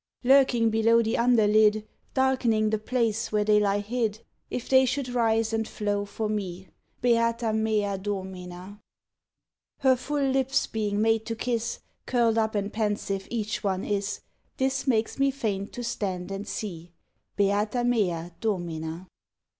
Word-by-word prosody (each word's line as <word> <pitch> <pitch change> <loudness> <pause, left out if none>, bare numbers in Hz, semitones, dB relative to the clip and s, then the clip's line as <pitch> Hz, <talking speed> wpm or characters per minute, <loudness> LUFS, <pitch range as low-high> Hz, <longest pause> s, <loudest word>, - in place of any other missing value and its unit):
_ - - -3
Lurking 255 -4 +5
below 225 +1 +4
the 225 +1 0
underlid, 215 -2 +4 0.3
Darkening 245 -5 +2
the 220 - 0
place 230 -1 -1
where 210 -1 +2
they 210 0 +4
lie 205 0 +1
hid: 220 0 -2 0.3
If 250 - -4
they 260 0 +6
should 265 0 -2
rise 225 -2 +1
and 220 0 0
flow 205 -1 -2
for 215 +2 -3
me! 190 -3 -4 0.3
Beata 230 -1 +2
mea 215 -3 0
Domina! 190 -1 -6 1.0
Her 265 -1 +5
full 280 +2 -1
lips 265 0 +1
being 210 -1 -1
made 225 0 +2
to 230 - -2
kiss, 235 0 -2 0.3
Curl'd 230 -3 +2
up 220 -1 0
and 205 0 -2
pensive 205 -3 -2
each 215 -2 -3
one 190 -2 -1
is; 200 -1 -2 0.4
This 265 +1 0
makes 225 0 +1
me 275 0 +4
faint 215 -7 -3
to 245 - -5
stand 190 -5 -3
and 195 +2 -5
see. 175 -6 -6 0.4
_Beata 205 +4 +1
mea 180 -8 0
Domina! 170 -5 -3
220 Hz, 145 wpm, -26 LUFS, 205-235 Hz, 1.0 s, they